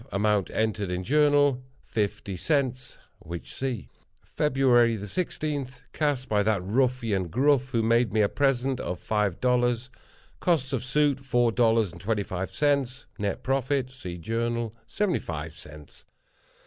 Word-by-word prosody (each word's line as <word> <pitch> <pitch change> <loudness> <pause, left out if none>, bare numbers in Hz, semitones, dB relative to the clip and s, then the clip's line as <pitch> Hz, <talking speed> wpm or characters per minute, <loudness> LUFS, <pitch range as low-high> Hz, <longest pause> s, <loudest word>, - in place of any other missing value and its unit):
Amount 105 -1 +1
entered 110 -3 -1
in 90 +1 -2
Journal—fifty 130 -7 +1
cents—which 125 - -3
see. 130 -5 -3 0.4
"Feb. 150 -2 -1 0.5
16.—Cast 145 - -2
by 105 -1 +2
that 100 -3 +1
ruffian, 115 -3 +1
Gruff, 135 - +2
who 115 -3 0
made 115 0 +3
me 110 +1 +2
a 105 - +4
present 135 0 +1
of 90 0 -4
five 105 -4 0
dollars. 125 0 +1 0.5
Costs 145 -7 +1
of 125 - -1
suit, 140 +1 +2
four 120 -3 +2
dollars 115 -4 +3
and 85 - -12
twenty 105 +1 0
five 95 0 -4
cents. 140 -3 0
Nett 100 -1 -2
profit,—see 130 -7 -1
Journal,—seventy 115 - -2
five 80 -1 -6
cents." 75 -1 -13
120 Hz, 120 wpm, -27 LUFS, 105-135 Hz, 0.5 s, a